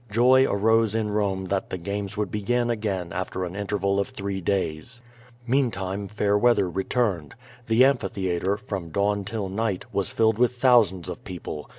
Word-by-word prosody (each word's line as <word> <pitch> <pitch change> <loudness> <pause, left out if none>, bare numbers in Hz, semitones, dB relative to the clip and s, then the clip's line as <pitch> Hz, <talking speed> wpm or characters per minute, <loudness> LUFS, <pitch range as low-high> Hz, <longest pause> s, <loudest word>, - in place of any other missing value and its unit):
Joy 125 +5 +5
arose 110 +1 +2
in 110 -2 0
Rome 100 -2 -1
that 95 -1 -1
tlift 90 -2 -6
games 100 +1 -4
would 105 - -2
begin 120 +3 0
again 95 -6 -3
after 95 +1 -3
an 90 +1 -7
interval 100 -1 -1
of 100 - 0
three 100 -1 -4
days. 95 +4 -2 0.5
Meantime 100 -7 -1
fair 105 0 0
weather 120 -4 +3
returned. 95 - -1 0.3
The 115 +3 +5
amphitheatre, 95 -7 0
from 100 -8 -6
dawn 100 +3 0
till 100 -1 -3
nighty 100 0 -2
wriS 100 -3 -1
filled 110 -1 +2
with 125 0 +2
thousands 115 -9 +4
of 90 - -7
people. 85 -6 -7
100 Hz, 165 wpm, -25 LUFS, 95-115 Hz, 0.5 s, Joy